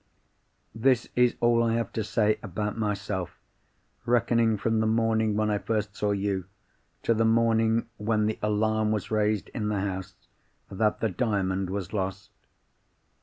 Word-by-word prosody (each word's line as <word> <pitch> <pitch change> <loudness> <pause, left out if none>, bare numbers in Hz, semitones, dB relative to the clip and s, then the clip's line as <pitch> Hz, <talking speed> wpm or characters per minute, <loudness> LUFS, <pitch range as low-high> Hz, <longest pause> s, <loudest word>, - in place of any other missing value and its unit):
"This 120 +2 +2
is 125 -1 +3
all 120 0 +4
I 115 -1 +1
have 115 0 -2
to 110 - -1
say 105 0 +1
about 105 +1 -3
myself, 100 -5 -3 0.7
reckoning 115 -2 +2
from 110 +2 0
the 110 - +2
morning 110 -1 +1
when 105 0 +1
I 105 - 0
first 105 -2 -2
saw 105 -2 -1
you, 100 -2 -1 0.6
to 115 - +3
the 115 0 +1
morning 115 0 +2
when 105 0 +1
the 110 0 -2
alarm 110 +1 +1
was 105 -1 -2
raised 105 -1 +1
in 110 -4 -3
the 105 -2 -1
house 95 -1 -4 0.6
that 105 +2 0
the 110 - +1
Diamond 95 -2 -1
was 100 0 -4
lost. 95 -2 -3
110 Hz, 155 wpm, -27 LUFS, 100-115 Hz, 0.7 s, all